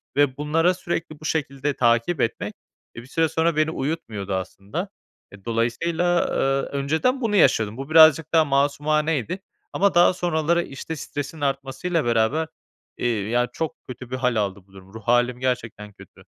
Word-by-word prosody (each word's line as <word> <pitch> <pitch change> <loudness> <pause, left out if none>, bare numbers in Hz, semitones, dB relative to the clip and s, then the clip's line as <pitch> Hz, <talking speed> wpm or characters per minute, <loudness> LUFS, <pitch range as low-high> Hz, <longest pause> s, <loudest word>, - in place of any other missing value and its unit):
Ve 140 -2 +2
bunlara 165 +5 +2
sürekli 170 -3 -4
bu 155 - -11
şekilde 140 -2 -1
takip 120 +7 +2
etmek, 115 - -2 0.4
e, 115 - -7
bir 125 - -15
süre 160 +2 +1
sonra 165 +1 +1
beni 155 +1 +2
uyutmuyordu 115 - -4
aslında. 100 - -4 0.4
E, 100 0 -15
dolayısıyla, 165 +10 0
eee, 135 +1 0
önceden 160 - 0
bunu 215 -3 0
yaşıyordum. 110 - +3
Bu 135 +2 -6
birazcık 160 0 +6
daha 160 -1 +5
masumaneydi. 145 - 0 0.3
Ama 195 -1 +2
daha 175 +1 +6
sonraları, 170 -1 0
işte 145 +4 -7
stresin 145 +1 -6
artmasıyla 135 +4 -1
beraber, 120 +7 +1 0.5
eee, 120 - -1 0.2
ya, 120 +1 +2
çok 160 -2 -3
kötü 125 0 -9
bir - - -1
hâl 125 -2 0
aldı 100 -2 -1
bu 95 - -24
durum. 95 0 -15
Ruh 110 - -9
hâlim 120 +1 +2
gerçekten 115 -5 -3
kötü. - - -16
140 Hz, 160 wpm, -23 LUFS, 120-160 Hz, 0.5 s, birazcık